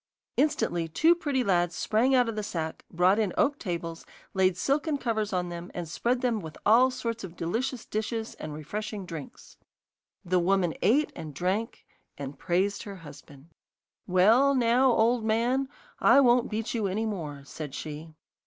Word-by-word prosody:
Instantly 275 - +1
two 315 - +4
pretty 290 -6 -1
lads 175 -4 +1
sprang 240 +5 +2
out 250 -2 +4
of 230 - -3
the 215 - -2
sack, 160 -6 -4
brought 180 +5 +3
in 210 -4 +1
oak 285 +1 +2
tables, 170 -3 -4 0.3
laid 190 -2 +2
silken 290 - 0
covers 220 -5 -1
on 180 -2 -1
them, 175 0 -7
and 175 -2 -4
spread 245 +10 -1
them 240 -4 +1
with 160 -5 -9
all 240 +5 +6
sorts 230 -3 -4
of 180 -2 -8
delicious 235 +10 -2
dishes 220 +1 -3
and 155 - -6
refreshing 205 +7 -5
drinks. 165 -5 -9 0.7
The 180 +1 +2
woman 180 -1 +2
ate 285 +10 +3
and 150 -3 -8
drank, 190 +8 -2 0.3
and 140 0 -7
praised 190 +3 0
her 200 -3 -7
husband. 145 +1 -14 0.6
'Well, 225 +10 +5
now, 250 +1 +4
old 230 +1 +2
man, 240 +5 +1 0.3
I - - +6
won't 245 -1 +4
beat 225 +1 -3
you 220 -4 0
any 210 +4 -1
more,' 155 -10 -5
said 145 -1 -7
she. 155 +1 -7
210 Hz, 165 wpm, -28 LUFS, 170-240 Hz, 0.7 s, all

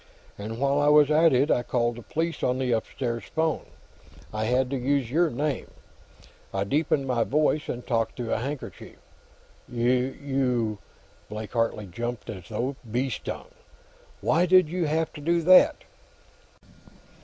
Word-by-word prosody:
And 110 +2 -6
while 140 +2 +1
I 145 - +2
was 150 0 +6
at 160 +2 +5
it, 135 +4 +3
I 125 - +3
called 120 -1 0
the - - -7
police, 165 +7 -3
on 125 0 +1
the 130 -1 -1
upstairs 115 +1 -2
phone. 160 -1 -1 0.7
I 110 0 -1
had 125 +3 +2
to - - 0
use 130 -1 0
your 170 +3 +3
name; 145 +1 -2 0.8
I 95 - -1
deepened 140 +4 +1
my 125 -3 +1
voice 150 +2 +1
and 125 0 -4
talked 115 -2 0
through 120 -2 -3
a - - 0
handkerchief." 140 +4 -6 0.7
"You 125 -2 0 0.2
" - - -31
Blake 105 0 -6
Hartley 115 -3 0
jumped 120 +6 -5
as 95 -5 -10
though 130 +3 -2
bee 130 +3 0
stung. - - -6 0.7
"Why 175 +3 +2
did 185 -3 +5
you 175 0 -1
have 160 +2 0
to 150 - -9
do 170 +2 +1
that?" 185 +2 +6
130 Hz, 155 wpm, -26 LUFS, 120-150 Hz, 0.8 s, was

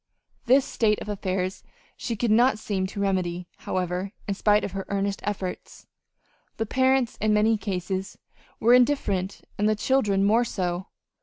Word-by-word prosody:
This 265 +2 +5
state 215 -2 +1
of - - -7
affairs 190 -2 -2 0.3
she 235 - -4
could 225 +1 0
not 240 +2 +4
seem 195 -3 -2
to 200 - -7
remedy, 180 -3 -1
however, 185 +2 -3
in 200 - 0
spite 210 +1 +3
of - - -3
her 195 0 -4
earnest 200 0 -1
efforts. 195 -3 -5 0.7
The 225 - -1
parents, 260 +1 +2
in 215 0 +3
many 220 +2 +4
cases, 190 -2 -3 0.4
were 235 +2 +5
indifferent, 225 -7 +2 0.2
and 210 +1 +3
the 215 - +2
children 210 -4 +2
more 220 +4 +4
so. 180 -4 -3
205 Hz, 155 wpm, -25 LUFS, 190-225 Hz, 0.7 s, This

